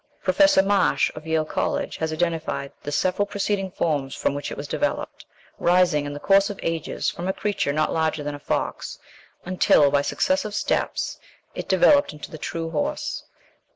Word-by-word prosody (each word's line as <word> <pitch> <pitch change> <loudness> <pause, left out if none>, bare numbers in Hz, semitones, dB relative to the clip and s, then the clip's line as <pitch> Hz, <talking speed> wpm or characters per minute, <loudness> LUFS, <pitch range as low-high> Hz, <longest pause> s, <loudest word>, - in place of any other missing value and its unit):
Professor 290 -10 +5
Marsh, 200 0 +2
of 155 +1 -10
Yale 160 -1 +1
College, - - -2
has 160 0 -2
identified 160 -4 -2
the 145 - -5
several 185 +6 +1
preceding 200 -1 -1
forms 145 -7 -1
from - - 0
which 145 0 -4
it - - -7
was 145 - -5
developed, 295 - -3 0.3
rising, 175 -5 +3
in 145 - -5
the 145 - -6
course 195 +5 +4
of 205 - -6
ages, 165 -1 -2
from 175 - -5
a 190 - +1
creature 205 -8 -1
not 155 +1 0
larger 160 -2 0
than 145 0 -3
a 145 - -7
fox - - -3 0.5
until, 165 -5 +4
by 140 - +3
successive 215 - 0
steps, - - -1 0.3
it - - -6
developed 290 - +4
into 150 - -9
the 155 - -8
true 165 +1 -4
horse. 290 - -2
165 Hz, 175 wpm, -24 LUFS, 150-200 Hz, 0.5 s, Professor